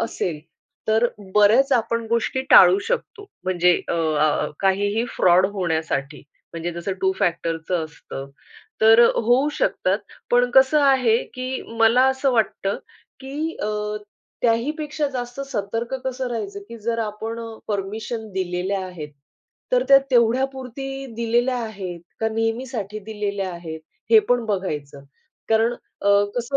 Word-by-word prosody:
असेल, 165 -8 -2 0.5
तर 220 +2 +4 0.3
बऱ्याच 215 +6 +5
आपण 230 -1 +1
गोष्टी 235 +3 0
टाळू 385 - +8
शकतो. 440 -4 -3 0.2
म्हणजे 180 -1 +3
अ, - - 0
अ, 155 -2 +1
काहीही 205 +4 +1
फ्रॉड 185 +1 +5
होण्यासाठी 160 -6 -2 0.3
म्हणजे 170 +1 -4
जसं 170 +3 -4
टू 190 0 +2
फॅक्टरचं 170 -2 -1
असतं, 140 -2 -9 0.5
तर 225 +1 +7
होऊ 245 +6 +3
शकतात. - - 0 0.3
पण 245 0 +3
कसं 265 +4 +5
आहे, 260 -5 +4
की 255 +1 -5 0.2
मला 230 +3 +5
असं 265 +1 +1
वाटतं, 205 -3 0 0.4
की 295 +5 -4
अ, 210 0 -2 0.5
त्याही 230 +4 +2
पेक्षा 300 -1 -2
जास्त 245 0 -5
सतर्क 230 0 -3
कसं 260 0 -3
राहायचं, 205 -4 -4
की 235 - -8
जर 230 +2 -2
आपण 220 +1 -4
अ, 230 - -6 0.2
परमिशन 215 +3 -4
दिलेल्या 185 +1 -2
आहेत, 155 -5 -8 0.6
तर - - +4
त्या 275 0 +9
तेवढ्यापुरती 265 +2 0
दिलेल्या 240 +2 +1
आहेत, 195 -6 -6 0.2
का 220 - +1
नेहमीसाठी 225 -1 -3
दिलेल्या 205 -3 -3
आहेत, 160 -2 -7 0.3
हे 225 - +9
पण 245 -1 +2
बघायचं. 150 -9 -3 0.4
कारण 225 +2 +3
अ, 200 - -6 0.3
कसं 245 +3 -1
220 Hz, 130 wpm, -22 LUFS, 190-245 Hz, 0.6 s, त्या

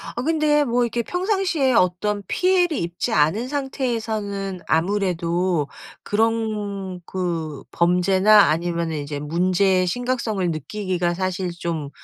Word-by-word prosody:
아 240 - -2
근데 300 0 +2
뭐 245 -2 +1
이렇게 235 0 -1
평상시에 360 - 0
어떤 200 +2 +1
피해를 360 -3 +2
입지 170 +1 -3
않은 160 +11 +2
상태에서는 220 -9 -3
아무래도 175 -2 0 0.4
그런 205 -4 -1
그 165 -6 -3
범죄나 190 +4 +4
아니면은 170 0 -1
이제 145 0 -5
문제의 185 +4 +2
심각성을 230 -4 -1
느끼기가 175 +3 -2
사실 185 0 -2
좀 170 -4 -4
190 Hz, 275 characters per minute, -22 LUFS, 175-235 Hz, 0.4 s, 범죄나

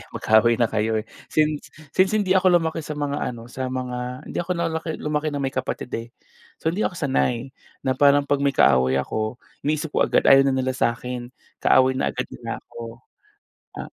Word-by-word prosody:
mag-kaaway 110 +2 +4
na 115 -2 +1
kayo, 110 0 0
eh. - - -24 0.2
Since 155 -1 0 0.2
since 190 +3 +3
hindi 205 -3 +1
ako 185 -1 +4
lumaki 165 -1 -1
sa 150 0 -6
mga 145 -1 -2
ano 120 -1 -5
sa 130 +1 -4
mga, 125 0 -4
hindi - - -4
ako 175 - -3
nalaki, 165 -1 -2
lumaki 150 +1 -1
na 140 - -2
may 135 - 0
kapatid 130 -1 -4
eh. 115 +1 -8 0.5
So, 160 - +2
hindi 200 +5 0
ako - - -4
sanay. 130 -4 0 0.3
Na 130 -1 -1
parang 145 0 +5
'pag 145 0 0
may 140 -1 +1
kaaway 65 - +4
ako, 110 - -3 0.3
iniisip 155 +1 0
ko - - +3
agad - - +2
ayaw 135 0 +7
na 135 - +2
nila 130 0 0
sa'kin, 125 +1 -2 0.2
kaaway 130 0 +4
na - - 0
agad - - -2
nila - - -6
ko. 115 +1 -9 0.8
Ah, - - -5
130 Hz, 195 wpm, -23 LUFS, 120-155 Hz, 0.8 s, ayaw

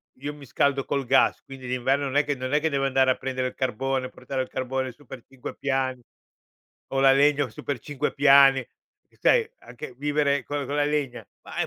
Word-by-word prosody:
io 145 +3 -6
mi 145 -1 -13
scaldo 140 +2 0
col 140 -2 -2
gas, - - +3
quindi 135 -2 -10
d'inverno 130 +3 0
non 135 +1 -4
è 145 - +4
che 145 -1 -2
non 130 +2 -5
è 150 - +4
che 160 +1 0
devo 135 -1 0
andare 130 -1 +3
a - - +1
prendere 130 0 -3
il - - -15
carbone, 130 +1 -2
portare 135 -1 -5
il 130 - -5
carbone 130 0 -3
su 145 +4 -21
per 120 0 -10
5 135 -2 -9
piani 130 -2 -1 0.9
o 135 - -1
la 135 0 +6
legna 145 -1 +3
su 110 - -12
per 140 -4 -3
5 145 +1 -3
piani. 140 -1 +6
Eh 125 - -17
sai 460 -2 +3
anche 125 - -10
vivere 145 -1 +1
con 145 +1 -4
con 140 - -4
la 145 - +2
legna, 145 -4 -2 0.2
ma, - - -11
eh, - - +2
135 Hz, 220 wpm, -25 LUFS, 130-145 Hz, 0.9 s, la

